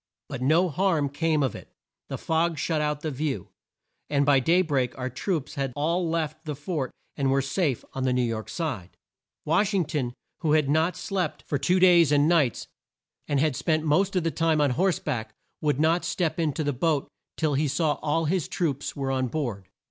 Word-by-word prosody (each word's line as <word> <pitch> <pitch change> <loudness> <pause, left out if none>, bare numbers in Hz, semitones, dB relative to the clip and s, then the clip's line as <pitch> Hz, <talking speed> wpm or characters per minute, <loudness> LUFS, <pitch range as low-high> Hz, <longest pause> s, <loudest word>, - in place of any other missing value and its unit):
But - - -5
no 160 +8 +4
harm 165 -4 +1
came 155 +1 +1
of 130 - 0
it, - - -11 0.4
the - - -3
fog 165 0 0
shut 160 0 0
out 150 -1 -1
the 155 - -2
view, 135 - -3 0.6
and 140 -1 +2
by 140 -1 +5
day 170 +7 +3
break 135 -7 -1
our 130 0 -3
troops 155 - -2
had 135 -2 -2
all 165 +4 0
left 160 -1 -2
the 150 -2 -3
fort 145 -2 -3 0.3
and 135 -2 0
were 135 +1 +3
safe 140 - -1
on 135 - -4
the 130 - +2
New 125 0 +2
York 115 -2 -3
side. 100 - -4 0.5
Wash 205 0 +2
ing 180 -4 +2
ton, 135 -5 -3 0.2
who 155 -2 +1
had 155 -2 +3
not 160 +4 +2
slept 185 -6 -3
for 145 - -2
two 180 +7 +2
days 175 -5 +6
and 145 0 +4
nights, 160 -8 +2 0.6
and 145 -2 +1
had 150 -2 +2
spent 155 +3 0
the 160 - -1
most 190 +6 +2
of 180 - +2
the 165 - 0
time 160 -1 +1
on 145 -3 +3
horse 180 +7 +2
back, 110 -7 -4 0.3
would 145 -2 +1
not 165 +3 +3
step 170 -1 -1
in 160 -2 +1
to 155 - -2
the 145 -1 0
boat 145 +2 0 0.3
till 155 -3 +1
he 145 +2 +1
saw 150 +2 +1
that - - -12
all 160 +2 0
his 170 +1 0
troops 145 -6 -2
were 135 -1 -2
on 130 -1 0
board. 120 -9 -4
150 Hz, 215 wpm, -26 LUFS, 135-165 Hz, 0.6 s, days